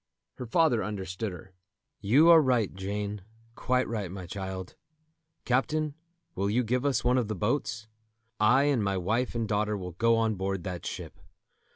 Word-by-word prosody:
Her 125 - -5
father 150 -4 +3
understood 100 0 -4
her. 90 +2 -11 0.5
"You 140 +12 +5
are 165 -1 +8
right, 125 -7 +1
Jane, 100 +2 -4 0.3
quite 125 +2 0
right, 105 -5 -3
my 95 0 -7
child. 95 0 -6 0.7
Captain, 150 +4 0 0.4
will 100 +2 -1
you 120 +4 +2
give 125 +4 0
us 140 - +1
one 125 +1 +3
of 120 - -1
the 110 - -3
boats? 110 +2 -2 0.5
I 120 +6 +5
and 140 -6 +2
my 100 -1 0
wife 110 +8 -1
and 115 -1 -1
daughter 105 0 0
will 90 -2 -6
go 115 +7 +2
on 110 -1 +1
board 95 -2 -3
that 90 -2 -5
ship. - - -7
110 Hz, 170 wpm, -28 LUFS, 95-125 Hz, 0.7 s, are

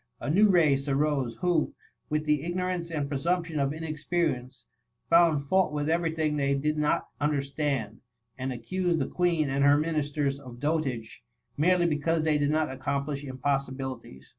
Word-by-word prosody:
A 145 - -2
new 205 +5 +5
race 150 -6 +3
arose, 140 -4 0
who, 175 -3 +1 0.3
with 150 0 -1
the 150 -2 +2
ignorance 175 +1 -2
and 150 -4 -2
presumption 165 +3 -1
of 140 0 +1
inexperience, 155 -4 -2 0.5
found 165 -4 +5
fault 190 +6 +2
with 150 +1 -1
every 170 0 +1
thing 155 -2 -1
they 140 -1 +1
did 150 +2 0
not 150 -1 0
understand, 140 -6 -1 0.3
and 130 0 -3
accused 170 +9 -1
the - - 0
Queen 170 -4 +1
and 140 0 0
her 145 +1 +6
ministers 150 -3 -1
of 125 -3 -11
dotage, 140 -6 -2 0.3
merely 175 +3 +3
be 155 -3 +1
cause 165 +1 +1
they 155 -2 +2
did 145 0 +1
not 155 -1 +1
accomplish 140 +2 -3
impossibilities. 130 - -3
150 Hz, 160 wpm, -28 LUFS, 140-165 Hz, 0.5 s, her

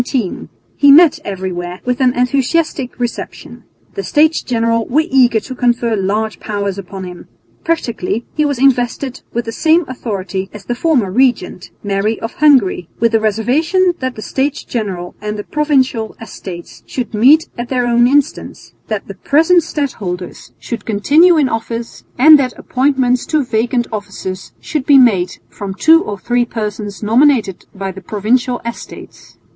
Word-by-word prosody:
He 285 -1 +6
met 320 +1 +6
everywhere 180 -2 -5
with 250 +1 -1
an 255 -1 +3
enthusiastic 270 +1 0
reception. 240 -1 -6 0.3
The 400 - -4
States 315 -2 +2
General 230 -1 0
were 305 +5 +2
eager 255 -7 +3
to 260 - -8
confer 240 -2 0
large 210 +2 -2
powers 200 -2 -3
upon 195 0 -8
him. 180 -1 -9 0.4
Practically 235 - -2
he 305 - +1
was 285 -3 0
invested 255 0 0
with 235 0 -3
the 225 - -4
same 320 +7 +2
authority 195 -6 -4
as 200 -3 -10
the 240 - -2
former 245 - +1
regent, 235 -6 0
Mary 205 +2 -1
of 225 - -5
Hungary, 255 - +3
with 230 0 +2
the 225 - +3
reservation 295 - +1
that 260 -1 -3
the 215 - -8
States 275 +2 -2
General 190 -7 -4
and 210 0 -4
the 205 - -5
Provincial 265 -7 0
Estates 185 -6 -9
should 250 -3 -4
meet 280 +10 +5
at 240 0 -5
their 250 -2 0
own 240 0 +3
instance, 280 +1 -1
that 215 -3 -3
the 195 - -7
present 320 - +3
stadholders 200 - -5
should 230 -3 -6
continue 300 - +4
in 290 -3 +3
office, 230 0 -5
and 300 +4 +8
that 255 -2 -2
appointments 255 -2 +1
to 305 -4 0
vacant 240 +1 0
offices 190 -3 -6
should 300 -5 -4
be 285 - +7
made 205 -9 +3
from 195 -2 -7
two 325 +8 +5
or 205 - -5
three 240 +5 0
persons 210 -3 -5
nominated 230 -3 +2
by 195 0 -4
the 190 +1 -11
Provincial 240 +6 0
Estates. 235 - -9
240 Hz, 155 wpm, -15 LUFS, 205-275 Hz, 0.4 s, and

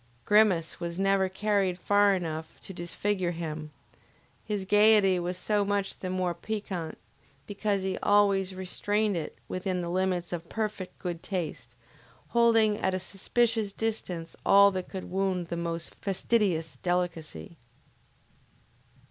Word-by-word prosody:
Grimace 205 -6 +3
was 170 0 -4
never 195 0 +2
carried 195 -2 0
far 205 +1 +4
enough 160 -3 -5
to 190 - -8
disfigure 185 +2 -1
him; 160 -2 -5 0.7
his 205 -3 -3
gayety 205 -2 +5
was 175 +1 -3
so 210 +1 +1
much 200 -1 -1
the 185 - -4
more 185 -1 0
piquant 190 -6 -4 0.5
because 200 -1 -1
he 190 0 -2
always 195 -2 +3
restrained 205 +3 0
it 165 -3 -4
within 185 0 -2
the 170 - -4
limits 180 -1 0
of 170 -1 -5
perfect 215 -4 -4
good 175 -2 -4
taste, 180 -6 -4 0.5
holding 225 -3 +4
at 190 0 0
a - - -1
suspicious 220 +3 0
distance 185 -7 -4
all 200 0 +7
that 185 -1 -4
could 190 -2 -5
wound 185 -2 -1
the 170 - -2
most 170 0 -4
fastidious 190 -5 0
delicacy. 175 - -3
190 Hz, 130 wpm, -28 LUFS, 175-205 Hz, 0.7 s, all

